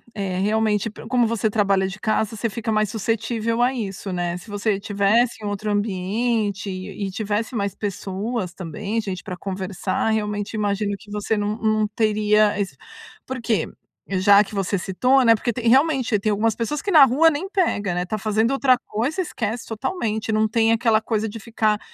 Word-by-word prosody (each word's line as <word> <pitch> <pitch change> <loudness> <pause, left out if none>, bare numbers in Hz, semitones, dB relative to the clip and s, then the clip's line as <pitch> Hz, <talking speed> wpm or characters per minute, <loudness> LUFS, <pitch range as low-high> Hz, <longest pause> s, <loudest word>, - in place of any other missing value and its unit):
é 190 -3 -2
realmente 215 +1 +1
pro 215 - -11
como 245 -1 +2
você 225 -1 0
trabalha 200 -2 +2
de 195 +2 -7
casa, 220 0 0
você 230 +2 -1
fica 225 +1 -3
mais 215 -1 +1
suscetível 225 +2 -1
a 250 +2 +3
isso, 200 -5 -5
né? 175 -1 -2
Se 180 - -13
você 205 +1 0
estivesse 210 +3 +1
em - - -3
outro 205 +1 -2
ambiente 205 +1 -1
e 190 +1 -5
tivesse 210 +3 -2
mais 200 -3 -2
pessoas 200 0 -3
também, 195 +6 -3
gente 190 -4 -5
pra 185 -4 -5
conversar, 190 +1 -2
realmente, 210 -1 -2
imagino 205 -1 -1
que 205 +2 -15
você 210 +1 -1
não 205 +1 -1
não 215 -1 +1
teria 210 -1 +2
ess 200 -2 -3 0.5
porque 235 -4 -1 0.4
já 200 +2 +6
que 210 +1 -10
você 195 0 0
citou, 250 +9 +2
né? 230 -1 +7
Porque 235 +2 -2
tem 235 -1 0
realmente, 265 -3 +3
tem 215 +2 0
algumas 215 +1 +1
pessoas 260 +6 -2
que - - -4
na 305 -6 +9
rua 285 +6 +4
nem 320 +5 -3
pega, 330 - 0
né? 180 0 -1
Tá 215 +4 -3
fazendo 215 +2 +1
outra 275 -1 +4
coisa, 255 - -1
esquece 230 - -3
totalmente. 220 - -2
Não 215 0 +2
tem 225 +1 +2
aquela 225 -1 +3
coisa 220 -1 -1
de 225 +2 -8
ficar 215 -1 0
215 Hz, 185 wpm, -22 LUFS, 200-230 Hz, 0.5 s, na